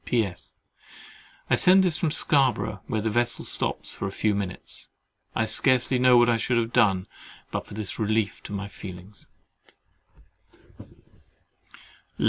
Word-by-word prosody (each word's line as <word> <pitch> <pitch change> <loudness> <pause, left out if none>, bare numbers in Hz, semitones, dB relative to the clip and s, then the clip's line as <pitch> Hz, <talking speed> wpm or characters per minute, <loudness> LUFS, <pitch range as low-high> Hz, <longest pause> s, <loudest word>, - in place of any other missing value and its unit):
P.S.—I 105 -7 -6
send 190 +1 +6
this 175 -3 0
from 165 - 0
Scarborough, 125 - +2
where 110 -3 -2
the 110 +1 -2
vessel 120 +1 -1
stops - - 0
for - - -4
a - - -5
few 105 +2 0
minutes. 100 -2 -5 0.5
I 110 - +1
scarcely 130 +2 +2
know 125 -1 +5
what 120 0 +5
I 120 -1 +2
should 120 +2 -1
have 115 0 -1
done, 95 -4 +2 0.5
but - - -4
for - - -10
this 105 -4 -6
relief 110 -1 -1
to - - -8
my 100 0 -4
feelings. 95 0 -11
110 Hz, 135 wpm, -25 LUFS, 100-125 Hz, 0.5 s, send